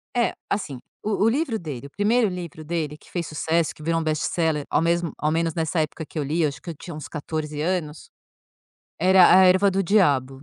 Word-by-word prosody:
É. 240 -1 +2 0.2
Assim, 145 -11 -3 0.2
o 210 -1 0
o 225 - +5
livro 260 -3 0
dele 140 -5 -7
o - - -17
1º 220 - +2
livro 170 -4 -7
dele 155 -2 -3
que - - -21
fez 170 -2 -3
sucesso, 160 +2 0
que 155 - -14
virou 165 +1 +1
um 165 - -2
best-seller 155 -1 0
ao 150 - +2
mesmo 170 -1 0
ao 150 +1 0
menos 165 -1 0
nessa 165 0 -1
época 155 +1 -4
que 155 - -11
eu 150 - 0
li, 155 +5 -1
eu 155 - +3
acho 140 - -10
que - - -9
eu - - -10
tinha 170 +3 -9
uns 155 - -7
14 150 0 -4
anos, 160 -3 -3 0.9
era 185 +1 +6
A - - +7
erva 190 +2 +5
do 195 +1 0
Diabo. 140 -9 +2
165 Hz, 225 wpm, -24 LUFS, 150-185 Hz, 0.9 s, A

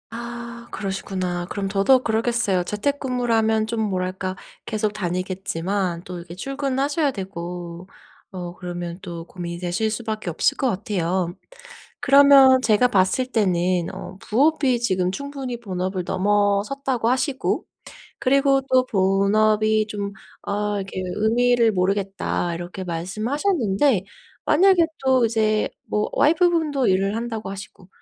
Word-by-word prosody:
아 235 0 -7
그러시구나. 185 -3 -3
그럼 200 -1 -3
더더욱 205 +7 +3
그러겠어요. 225 -4 +1
재택근무를 250 +3 -1
하면 220 -1 +2
좀 230 0 -3
뭐랄까 185 -2 -2 0.3
계속 215 -1 -1
다니겠지만 185 -1 -2
또 180 0 -7
이렇게 170 0 -9
출근하셔야 275 - -1
되고 175 -3 -7 0.4
어 175 -2 -6
그러면 175 -1 -6
또 170 -3 -7
고민이 170 -1 -7
되실 180 +5 -1
수밖에 215 -3 -4
없을 165 - +1
것 265 - +1
같아요. 185 -4 -1 0.7
그러면 275 -1 +7
제가 220 +1 +4
봤을 190 +5 +2
때는 180 -6 +1
어 185 - -8
부업이 270 +1 +2
지금 185 -5 +1
충분히 270 +1 -5
본업을 185 -3 -3
넘어섰다고 205 +6 +1
하시고, 265 +2 0 0.5
그리고 275 +1 +3
또 255 0 +5
본업이 215 +2 +2
좀 200 -1 -4 0.3
어 205 0 -1
이렇게 195 -1 -4 0.2
'의미를 235 +1 +3
모르겠다.' 195 -2 -1
이렇게 175 +3 -6
말씀하셨는데 215 - 0 0.4
만약에 360 +2 +5 0.2
또 260 -2 +4
이제 215 -1 +1 0.2
뭐 210 0 -1
와이프분도 320 -4 +2
일을 195 +2 +2
한다고 225 -3 -4
하시고. 195 -2 -10
210 Hz, 300 characters per minute, -23 LUFS, 185-245 Hz, 0.7 s, 그러면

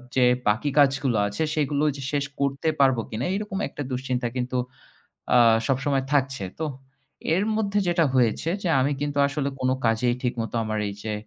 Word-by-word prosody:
যে 130 -1 +5 0.2
বাকি 110 +8 +2
কাজগুলো 135 -4 +3
আছে 100 +9 -2
সেগুলো 145 -1 0
যে 140 - -7
শেষ 145 -1 0
করতে 140 +3 0
পারব 135 -2 +4
কিনা 110 +4 -3
এরকম 210 -1 -4
একটা - - -8
দুশ্চিন্তা 125 -1 -2
কিন্তু 125 0 -2 0.8
আ - - +7 0.3
সবসময় 135 0 +1
থাকছে। 135 -5 +1 0.2
তো 160 - -1 0.7
এর 190 - +1
মধ্যে 205 -2 0
যেটা 170 -2 +3
হয়েছে 125 +5 +2
যে 175 - 0
আমি 135 +3 +2
কিন্তু 145 -1 -2
আসলে 140 -1 -2
কোন 130 0 +1 0.2
কাজেই 115 +2 +2
ঠিকমতো 120 -2 -2
আমার 110 0 -2
এই 100 - -4
যে 110 -1 -2
135 Hz, 170 wpm, -25 LUFS, 125-145 Hz, 0.8 s, আ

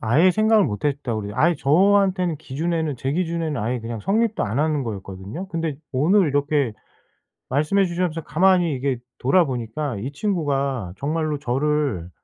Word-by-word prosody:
아예 145 +12 +4
생각을 215 +2 +4
못 105 -1 -4
했다 140 -4 -1
그래요. 105 -1 -4
아예 170 +2 +4
저한테는 185 +3 +3
기준에는 160 +1 -2
제 135 +3 -2
기준에는 165 -5 -1
아예 120 +3 -2
그냥 115 0 -5
성립도 220 - +1
안 110 +5 -2
하는 150 -1 +1
거였거든요. 100 - -6
근데 165 -4 -3 0.2
오늘 165 +7 +3
이렇게 145 -3 +1 0.8
말씀해 155 +9 +2
주셔서 170 -2 -2
가만히 175 -2 +3
이게 130 -1 -1 0.2
돌아 170 +8 +4
보니까 130 0 -3
이 130 +7 -4
친구가 140 - -1
정말로 155 +1 -1
저를 135 - -1
150 Hz, 360 characters per minute, -22 LUFS, 130-170 Hz, 0.8 s, 아예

